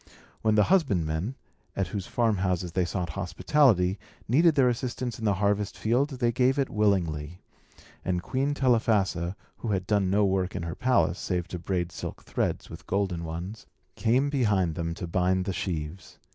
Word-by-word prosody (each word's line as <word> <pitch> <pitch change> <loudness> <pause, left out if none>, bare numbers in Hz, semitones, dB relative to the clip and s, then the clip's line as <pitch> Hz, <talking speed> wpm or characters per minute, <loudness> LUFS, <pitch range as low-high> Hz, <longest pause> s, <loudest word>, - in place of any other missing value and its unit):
When 110 -1 +2
the 105 - +5
husbandmen, 100 - +1 0.4
at 95 -3 -1
whose 100 -3 -4
farmhouses 95 -6 0
they 90 +1 +1
sought 85 0 -3
hospitality, 95 - +2 0.3
needed 155 +7 +4
their 135 -3 +5
assistance 120 -1 -2
in 110 - -4
the 100 -2 +3
harvest 100 +1 0
field, 125 +6 +1
they 125 -4 0
gave 130 +3 +2
it 135 -2 0
willingly; 90 -6 0 0.6
and 90 -1 -1
Queen 135 +2 -1
Telephassa 105 -9 +2 0.2
(who - - -6
had 95 -3 0
done 100 -2 +2
no 100 +2 +3
work 95 -1 0
in - - -3
her 85 -1 -4
palace, 100 -9 +2
save 90 -2 -2
to 90 - -5
braid 85 -1 -2
silk - - -7
threads - - -2
with - - -11
golden 95 -3 -1
ones) 85 +7 -6 0.3
came 130 +5 +2
behind 105 - +2
them 85 +1 -3
to 90 - -5
bind 90 +2 +1
the 95 - -2
sheaves. 90 -1 -5
100 Hz, 170 wpm, -27 LUFS, 90-120 Hz, 0.6 s, the